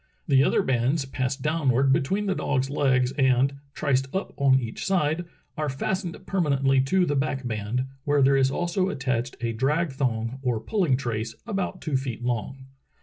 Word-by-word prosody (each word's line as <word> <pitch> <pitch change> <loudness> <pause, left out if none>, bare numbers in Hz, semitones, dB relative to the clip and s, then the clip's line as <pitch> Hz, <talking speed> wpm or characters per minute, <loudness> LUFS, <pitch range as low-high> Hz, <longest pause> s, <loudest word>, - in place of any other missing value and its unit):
The 135 -2 +5
other - - +2
bands 130 +4 +1
pass 130 0 -2
downward 135 -2 +2
between 195 +11 0
the 195 - +1
dog's 135 -6 -1
legs 130 -3 +2
and, 135 +1 +3 0.2
triced 135 -2 +1
up 190 - -2
on 135 -1 +4
each 115 -3 -5
side, 175 -3 +1 0.3
are 150 -1 -2
fastened 175 +6 -2
permanently 140 -7 +2
to 180 +8 +2
the 145 - 0
back 135 -1 -1
band, 110 +3 -2 0.2
where 145 -1 +3
there 135 +1 +5
is 135 -1 +3
also 175 +5 0
attached 130 -5 -2
a 115 -1 -1
drag 150 +7 0
thong 125 -2 -2
or 125 -4 0
pulling 170 - +1
trace 115 -3 -3
about 195 -4 -3
two 150 -4 0
feet 125 -3 -5
long. 125 +2 -3
135 Hz, 170 wpm, -25 LUFS, 130-150 Hz, 0.3 s, The